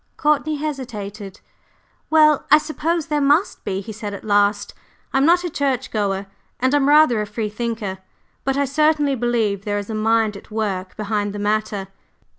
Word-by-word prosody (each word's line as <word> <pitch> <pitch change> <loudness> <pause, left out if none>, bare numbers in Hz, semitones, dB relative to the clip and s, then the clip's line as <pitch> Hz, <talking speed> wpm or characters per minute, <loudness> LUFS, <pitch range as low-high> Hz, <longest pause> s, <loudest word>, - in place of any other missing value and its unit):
Courtney 300 0 +1
hesitated. 215 -9 -6 0.7
"Well, 305 -2 +4
I 300 - +8
suppose 315 +1 -2
there 295 0 -1
must 290 +7 +2
be," 195 -1 -2
he 210 - -8
said 210 -1 -6
at - - -10
last. 205 -1 +1 0.4
"I'm 270 +2 +3
not 350 +1 +4
a - - -1
church 270 -3 -1
goer, 200 -2 -1 0.3
and 260 +2 +1
I'm 285 -1 +3
rather 295 -7 +5
a 210 - -4
free 210 +1 -3
thinker, 215 -3 -4 0.4
but 270 0 0
I 280 - +2
certainly 295 0 +2
believe 225 -5 0
there 205 0 -1
is 205 +2 -5
a - - -3
Mind 220 0 +1
at 200 - -12
work 200 -4 -3
behind 205 -1 -2
the - - -5
Matter." 205 -1 -1
225 Hz, 175 wpm, -21 LUFS, 205-290 Hz, 0.7 s, I